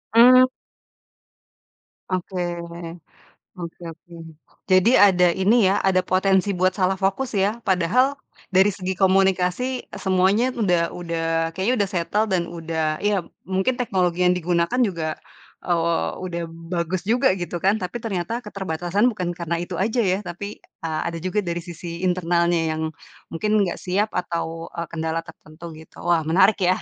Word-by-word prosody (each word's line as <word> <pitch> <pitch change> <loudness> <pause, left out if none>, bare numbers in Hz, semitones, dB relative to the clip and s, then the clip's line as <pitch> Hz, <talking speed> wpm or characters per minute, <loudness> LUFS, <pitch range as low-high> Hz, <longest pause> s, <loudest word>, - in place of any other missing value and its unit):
Mmm. 255 +2 +8 1.6
Oke, 185 0 -3 1.2
oke 175 -1 -8
oke. 165 +2 -17 0.6
Jadi 185 +5 +5
ada, 180 -3 +6
ini 190 +6 +2 0.2
ya, 205 - +1
ada 185 -1 +2
potensi 190 +1 +2
buat 185 0 +1
salah 190 -1 +1
fokus 200 +7 0
ya, 210 +3 0
padahal 230 +10 +2 0.3
dari 190 +1 +5
segi 190 -1 -3
komunikasi 190 +6 +2
semuanya, 190 +6 +2
udah 180 -9 +1
udah, 170 -2 -4 0.3
kayaknya 210 +7 +1
udah 200 -2 +1
settle, 205 +6 0
dan 185 -4 +1
udah, 160 -2 -2
ya, 205 -3 +1 0.2
mungkin 190 +7 0
teknologi 180 -7 +1
yang 180 - +3
digunakan 175 +5 0
juga, 165 -6 -2 0.5
eee, 170 -1 +1
udah 175 -2 -4
bagus 170 +3 -4
juga, 240 -1 +3
gitu, 175 -1 -5
kan, 200 +3 +3
tapi 180 +3 -5
ternyata 225 +3 -3
keterbatasan 190 +1 -1
bukan 180 -7 -2
karena 170 -1 -3
itu 175 -1 -6
aja 225 +5 +1
ya, 190 0 +1
tapi 200 +1 -7 0.2
a 160 -1 -2
ada 170 - -4
juga 185 +3 0
dari 175 -3 -3
sisi 170 0 -7
internalnya 175 -1 +1 0.2
yang 160 - -4 0.5
mungkin 210 +6 -2
enggak 180 - -3
siap 200 +4 -1
atau, 165 -1 -3
eee, 170 -1 -4
kendala 160 0 -2
tertentu, 165 0 -12
gitu. 160 - -14
Wah, 170 -3 +1
menarik 190 +5 +4
ya. 185 0 +3
185 Hz, 145 wpm, -23 LUFS, 170-200 Hz, 1.6 s, Mmm